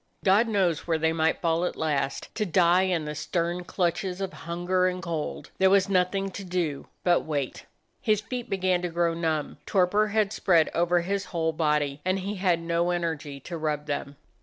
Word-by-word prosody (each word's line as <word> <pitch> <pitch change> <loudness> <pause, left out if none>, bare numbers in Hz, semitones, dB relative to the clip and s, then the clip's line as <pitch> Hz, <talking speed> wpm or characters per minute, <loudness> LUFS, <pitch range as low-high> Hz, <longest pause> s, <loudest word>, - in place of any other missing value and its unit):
God 205 +5 +5
knows 185 -8 +1
where 165 -1 +2
they 160 +1 +1
might 160 0 +1
fall 165 0 +2
at 180 - -1
last, 150 -3 -2
to 215 - -1
die 180 -1 +4
in 165 -4 0
the 150 - -4
stern 170 +3 -2
clutches 180 +1 -1
of 195 -1 -3
hunger 175 +2 0
and 185 0 -2
cold. 165 -3 -4
There 190 0 +5
was 195 0 +4
nothing 195 +1 +1
to 195 - -7
do 175 -6 -2 0.2
but 175 -1 +4
wait. 145 -4 -4 0.3
His 215 -2 +2
feet 245 +3 -5
began 185 -2 +1
to 180 - -2
grow 170 0 +1
numb, 160 -3 -2
torpor 205 +3 +3
had 210 -1 +1
spread 170 -4 +3
over 175 +1 +2
his 195 +2 -2
whole 165 -3 -1
body, 150 -2 0
and 185 +1 +1
he 195 +2 -4
had 180 -3 +2
no 170 +1 0
energy 160 -5 -2
to 170 +5 -6
rub 150 -1 -1
them. 145 -1 -4
175 Hz, 190 wpm, -27 LUFS, 160-190 Hz, 0.3 s, God